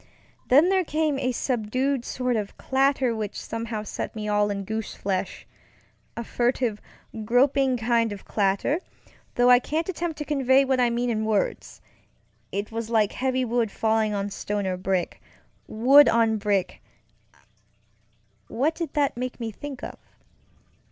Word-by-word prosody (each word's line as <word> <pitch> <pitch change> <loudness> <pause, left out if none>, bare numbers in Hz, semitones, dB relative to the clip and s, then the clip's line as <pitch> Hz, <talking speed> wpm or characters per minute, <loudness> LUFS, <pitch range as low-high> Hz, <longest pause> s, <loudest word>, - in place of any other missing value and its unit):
Then 295 +8 +5
there 380 -1 +3
came 305 -3 0
a 255 -1 0
subdued 255 +2 -1
sort 250 -1 -1
of 210 -2 -4
clatter 265 -2 +1
which 215 -2 -4
somehow 225 -1 -4
set 215 - -5
me 210 -1 -4
all 210 0 +2
in 200 -1 -3
goosefleshŌĆöa 200 -3 -3 0.8
furtive, 240 -3 0 0.4
groping 260 +3 +3
kind 230 -1 +1
of 200 -1 -8
clatter, 200 - 0 0.6
though 245 +1 +5
I 245 - +8
can't 315 +6 -2
attempt 340 -3 -3
to 300 - -4
convey 275 -2 +3
what 265 -1 +1
I 245 -1 +4
mean 240 +1 -1
in 220 -1 -1
words. 215 -2 -2 0.7
It 200 +2 -3
was 225 0 -4
like 220 -3 +2
heavy 260 0 -1
wood 235 -1 0
falling 220 +1 +1
on 200 0 -2
stone 205 0 -3
or 185 -1 -1
brickŌĆöwood 220 +8 +2
on 225 -1 +2 2.1
brickŌĆöwhat 285 +7 0
did 335 0 -5
that 290 -2 +1
make 255 +1 -5
me 230 -2 -4
think 275 +4 -8
of? - - -7
240 Hz, 140 wpm, -25 LUFS, 215-270 Hz, 2.1 s, I